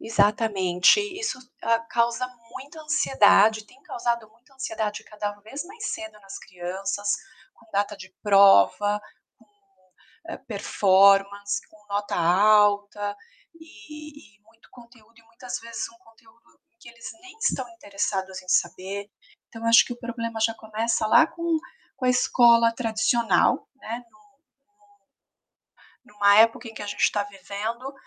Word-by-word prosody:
Exatamente, 205 - +2 0.2
isso, 415 -12 -3 0.2
hã, 230 0 +2
causa 235 +1 0 0.3
muita 280 +5 -10
ansiedade, 220 -7 +3
tem 260 +5 -22
causado 235 -4 -3
muita 240 +5 -28
ansiedade 265 -7 -4
cada 210 -1 -5
vez 225 +8 -8
mais 415 +3 -8
cedo 220 -1 -7
nas 195 0 -10
crianças, 195 +2 -4 0.4
com - - -23
data 205 0 -1
de 185 -1 -13
prova, 205 - +4 0.4
com - - -24 0.8
hã, - - -6
performance, 200 -1 +2
com 210 -1 -23
nota 205 0 -3
alta, 205 +3 +2 0.4
e 300 -4 -13
e - - -33
muito 225 +1 -25
conteúdo 235 -2 -19
e 230 - -21
muitas 230 +2 -8
vezes 230 -1 -6
um 230 - -21
conteúdo 230 -1 -25 0.2
que - - -14
eles 235 -1 -11
nem 375 +2 -14
estão 475 - -1
interessados 195 - -4
em - - -22
saber. 190 +3 -1 0.4
Então 225 0 -9
acho 230 +1 +7
que - - -6
o - - -15
problema 230 -1 -5
já 225 +1 +1
começa 220 0 -2
lá 320 +9 +6
com 335 0 -2 0.4
com 260 - -4
a - - +4
escola 235 -2 +4
tradicional, 225 -3 +1
né, 240 -1 -7
no 270 - -24 0.6
no 410 -1 -30 1.1
numa 205 -3 +3
época 230 +2 +4
em 225 - -10
que - - -9
a - - -5
gente 205 - -5
está 205 - +2
vivendo, 205 +6 -6
220 Hz, 140 wpm, -24 LUFS, 205-235 Hz, 1.1 s, acho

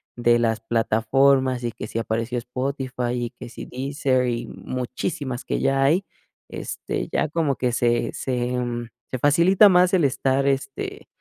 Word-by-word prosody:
de 120 0 +3
las 115 -1 0
plataformas 125 +3 +2
y 120 - -1
que 105 - -7
si 115 - -3
apareció 115 +2 -2
Spotify 125 0 -3
y 120 -1 -2
que - - -10
si 115 - -8
Deezer 130 -1 0
y 120 -1 -2
muchísimas 130 +2 -4
que - - -1
ya 135 0 +2
hay, 170 +8 +3 0.4
este, - - -4
ya - - +1
como 155 -3 0
que 125 -1 0
se 120 -1 +1
se 125 -1 -2 0.6
se 130 - -3
facilita 175 - +6
más 180 +1 +4
el 170 -6 +4
estar, 135 +1 +1
este, 135 0 -3
130 Hz, 155 wpm, -23 LUFS, 120-140 Hz, 0.6 s, facilita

